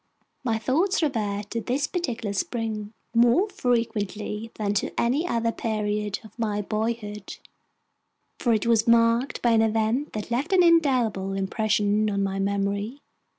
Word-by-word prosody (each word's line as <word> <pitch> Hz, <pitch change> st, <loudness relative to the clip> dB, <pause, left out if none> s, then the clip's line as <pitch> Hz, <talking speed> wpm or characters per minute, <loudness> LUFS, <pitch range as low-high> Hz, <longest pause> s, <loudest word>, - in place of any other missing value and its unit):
My 230 Hz, -3 st, +1 dB
thoughts 325 Hz, -, +1 dB
revert 210 Hz, -7 st, -2 dB
to 230 Hz, -, -2 dB
this 260 Hz, +5 st, 0 dB
particular 245 Hz, -, -3 dB
spring 215 Hz, 0 st, -3 dB, 0.2 s
more 240 Hz, -, +4 dB
frequently 225 Hz, -, -2 dB
than 205 Hz, -2 st, -1 dB
to 200 Hz, -, -2 dB
any 275 Hz, +9 st, +1 dB
other 230 Hz, -5 st, 0 dB
period 210 Hz, -2 st, -2 dB
of 220 Hz, +2 st, -16 dB
my 210 Hz, -2 st, 0 dB
boyhood, 215 Hz, 0 st, -3 dB, 1.0 s
for 240 Hz, -, +1 dB
it 220 Hz, -1 st, +1 dB
was 230 Hz, -1 st, +3 dB
marked 230 Hz, +2 st, +3 dB
by 240 Hz, -, +4 dB
an 225 Hz, -1 st, +4 dB
event 225 Hz, +6 st, 0 dB
that 215 Hz, +2 st, -5 dB
left 270 Hz, +10 st, 0 dB
an 365 Hz, -1 st, +6 dB
indelible 255 Hz, -, +3 dB
impression 210 Hz, +1 st, +1 dB
on 200 Hz, -1 st, 0 dB
my 195 Hz, 0 st, -2 dB
memory. 200 Hz, +5 st, -1 dB
225 Hz, 145 wpm, -25 LUFS, 210-245 Hz, 1.0 s, an